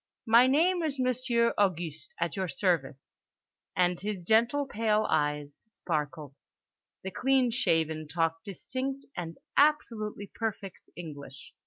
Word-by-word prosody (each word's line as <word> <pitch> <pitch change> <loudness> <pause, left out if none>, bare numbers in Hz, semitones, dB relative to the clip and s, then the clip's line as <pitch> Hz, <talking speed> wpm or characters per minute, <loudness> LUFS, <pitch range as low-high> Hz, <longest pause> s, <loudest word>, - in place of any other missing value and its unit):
"My 235 +2 +6
name 340 +7 +3
is 305 -4 -1
Monsieur 250 -2 +2
Au 200 -1 +6
guste, 160 -4 -8
at 170 0 -1
your 190 -2 -1
service"—and 175 +1 -2
his 200 -3 -4
gentle 235 +9 +3
pale 215 -3 +1
eyes 150 -1 0 0.2
sparkled. 150 - -4 0.7
The 190 - -4
clean 260 +2 +2
shaven 160 - 0
talked 165 +1 -1
distinct 260 +7 -4
and 165 -2 -5 0.2
absolutely 225 -9 +1
perfect 205 -4 -5
English. 145 -5 -10
200 Hz, 120 wpm, -29 LUFS, 165-245 Hz, 0.7 s, My